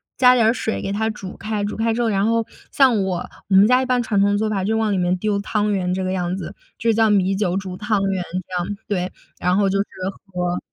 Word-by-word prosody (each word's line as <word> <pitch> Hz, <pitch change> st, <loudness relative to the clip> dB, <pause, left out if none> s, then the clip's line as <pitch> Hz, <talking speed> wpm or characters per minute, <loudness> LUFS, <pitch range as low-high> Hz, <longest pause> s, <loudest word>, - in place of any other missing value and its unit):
加 250 Hz, 0 st, +6 dB
点 230 Hz, -3 st, +3 dB
儿 225 Hz, -, +4 dB
水 220 Hz, -3 st, -3 dB
给 195 Hz, -, -3 dB
它 220 Hz, +2 st, 0 dB
煮 195 Hz, -3 st, -7 dB
开。 215 Hz, -1 st, -3 dB
煮 205 Hz, -, -3 dB
开 225 Hz, +1 st, 0 dB
之 235 Hz, -, -1 dB
后， 230 Hz, -, +1 dB
然 195 Hz, -1 st, +1 dB
后 230 Hz, 0 st, +1 dB, 0.3 s
像 250 Hz, -7 st, +4 dB
我， 185 Hz, -2 st, -2 dB, 0.2 s
我 195 Hz, -, +3 dB
们 195 Hz, +2 st, +7 dB
家 250 Hz, +2 st, +4 dB
一 260 Hz, -, -1 dB
般 250 Hz, -1 st, +1 dB
传 205 Hz, -3 st, +1 dB
统 205 Hz, 0 st, +3 dB
做 215 Hz, 0 st, 0 dB
法 195 Hz, -3 st, -1 dB
就 220 Hz, +3 st, 0 dB
往 220 Hz, -1 st, +1 dB
里 195 Hz, -, 0 dB
面 180 Hz, 0 st, +1 dB
丢 205 Hz, +1 st, 0 dB
汤 210 Hz, 0 st, 0 dB
圆 180 Hz, -2 st, 0 dB
这 190 Hz, +1 st, -2 dB
个 185 Hz, -, -1 dB
样 180 Hz, -1 st, -1 dB
子， 185 Hz, +1 st, -7 dB, 0.2 s
就 230 Hz, 0 st, +1 dB
叫 220 Hz, 0 st, +3 dB
米 195 Hz, -1 st, +2 dB
酒 190 Hz, -2 st, 0 dB
煮 190 Hz, -2 st, -5 dB
汤 210 Hz, 0 st, 0 dB
圆 195 Hz, -2 st, 0 dB, 0.2 s
这 185 Hz, -, -6 dB
样， 205 Hz, +3 st, -5 dB
对， 185 Hz, -3 st, -2 dB, 0.3 s
然 180 Hz, +1 st, +1 dB
后 200 Hz, -1 st, +3 dB
就 195 Hz, +1 st, 0 dB
是 200 Hz, -, +1 dB, 0.5 s
喝 180 Hz, 0 st, -1 dB
205 Hz, 285 characters per minute, -21 LUFS, 190-220 Hz, 0.5 s, 们